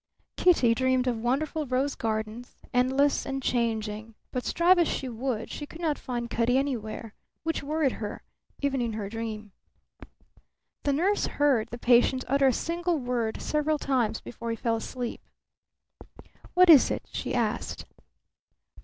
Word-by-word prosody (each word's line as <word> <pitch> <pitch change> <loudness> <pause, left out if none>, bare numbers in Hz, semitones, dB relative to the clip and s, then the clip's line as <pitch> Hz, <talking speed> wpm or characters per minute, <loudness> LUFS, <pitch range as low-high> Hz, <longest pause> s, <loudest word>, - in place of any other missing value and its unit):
Kitty 265 -10 +4
dreamed 260 +1 +1
of 240 -3 0
wonderful 290 +5 -1
rose 260 +3 0
gardens, 220 +2 -4 0.2
endless 265 +3 +3
and 270 -1 -4
changing; 220 -2 -1 0.2
but 250 -1 -2
strive 350 +2 +4
as 340 - +4
she 265 - -2
would 235 -1 -3
she 295 - -6
could 320 - -11
not 315 -4 -1
find 240 -2 -4
Cutty 235 +2 +1
anywhere, 230 -5 -3 0.3
which 325 0 -1
worried 295 -1 +1
her, 210 -3 -6 0.4
even 275 -2 0
in 235 -2 -1
her 210 -2 -4
dream. 220 -2 -5 1.3
The 285 - +2
nurse 380 +8 +1
heard 270 -6 +2
the 240 - -6
patient 245 +2 +4
utter 275 +1 +3
a - - +5
single 340 +6 -1
word 245 -4 -2
several 300 0 +1
times 245 -6 0
before 235 0 -7
he 230 - -1
fell 230 0 0
asleep. 245 +2 -5 1.3
"What 365 0 +7
is 290 -5 +8
it?" - - -2
she - - -3
asked. - - -2
255 Hz, 150 wpm, -27 LUFS, 230-285 Hz, 1.3 s, is